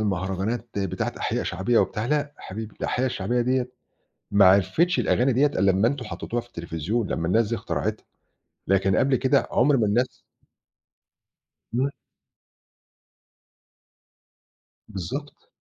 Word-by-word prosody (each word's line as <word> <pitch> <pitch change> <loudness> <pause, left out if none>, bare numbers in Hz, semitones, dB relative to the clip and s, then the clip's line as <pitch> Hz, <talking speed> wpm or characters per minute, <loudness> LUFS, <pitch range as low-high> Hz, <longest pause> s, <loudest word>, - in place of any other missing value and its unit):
المهرجانات 100 +4 -2
بتاعة 95 -2 -2
أحياء - - -1
شعبية 115 +5 +1
وبتاع 110 +1 0
لأ 145 +1 0
حبيبي، 110 +2 -7
الأحياء 130 +2 0
الشعبية 120 0 -1
ديّة 125 +1 0 0.6
ما 100 -1 +6
عرفتش 100 - +4
الأغاني 125 +2 +2
ديّة 135 +5 +4
ألّا 100 -8 +2
أمّا 100 +5 +3
أنتم 140 +2 -2
حطّيتوها 120 +1 -4
في 120 - -18
التليفزيون، 85 +3 -3
لمّا 80 - -1
الناس 110 +4 +2
دي 115 - 0
اخترعتها، - - -3 0.6
لكن 95 0 +3
قبل 135 +7 +3
كده 130 0 +2
عُمْر 135 +3 +4
ما 110 - +2
الناس 120 +5 +2 1.7
إمم. 130 +4 +1 3.0
بالضبط. 440 - -6
115 Hz, 125 wpm, -25 LUFS, 95-130 Hz, 3.0 s, ما